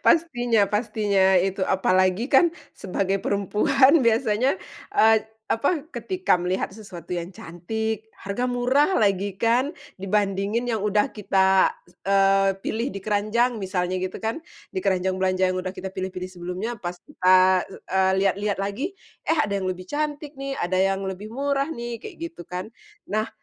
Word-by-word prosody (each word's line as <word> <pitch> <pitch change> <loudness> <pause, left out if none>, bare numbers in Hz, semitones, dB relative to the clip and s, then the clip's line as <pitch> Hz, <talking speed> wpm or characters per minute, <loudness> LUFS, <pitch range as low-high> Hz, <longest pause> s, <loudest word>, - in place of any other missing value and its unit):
Pastinya 245 -10 +3
pastinya 205 -3 +2
itu, 190 +2 +1
apalagi 185 +5 +2
kan 335 +6 +6 0.2
sebagai 195 0 -2
perempuan 260 - +3
biasanya, 235 - +2 0.4
eee, 220 0 +6 0.3
apa, 285 +6 +1
ketika 370 - 0
melihat 180 +2 -1
sesuatu 195 -5 -11
yang 175 +1 -4
cantik, 220 +6 -4
harga 205 +6 -3
murah 255 +8 +2
lagi 200 -2 +1
kan, 240 - +1 0.2
dibandingin 200 +3 0
yang 220 - 0
udah 210 0 +1
kita, 190 -2 +3
s 175 - -23 0.2
eee, 195 0 +4
pilih 230 +4 -1
di 200 - -6
keranjang 215 +3 +1
misalnya 185 -1 -1
gitu 185 0 -3
kan, 225 +8 -2 0.3
di 375 - -2
keranjang 185 - 0
belanja 185 0 +2
yang 185 - -2
udah 185 +1 -5
kita 190 - -5
pilih-pilih 185 -1 -5
sebelumnya, 180 +5 -5
pas 175 0 -4
kita, 185 -7 +4
eee, 190 0 0
lihat-lihat 200 +1 +1
lagi, 265 - -3 0.3
"eh 325 - +2
ada 200 -1 -1
yang 190 - -3
lebih 185 0 -4
cantik 295 -1 -3
nih", 275 0 -3
"ada 185 +1 -1
yang 195 0 +1
lebih 190 +3 -5
murah 275 +4 -1
nih", 235 -5 -5
kayak - - -9 0.2
gitu 175 - -10
kan. 180 +5 -5 0.4
Nah 215 +1 0
200 Hz, 150 wpm, -24 LUFS, 185-240 Hz, 0.4 s, kan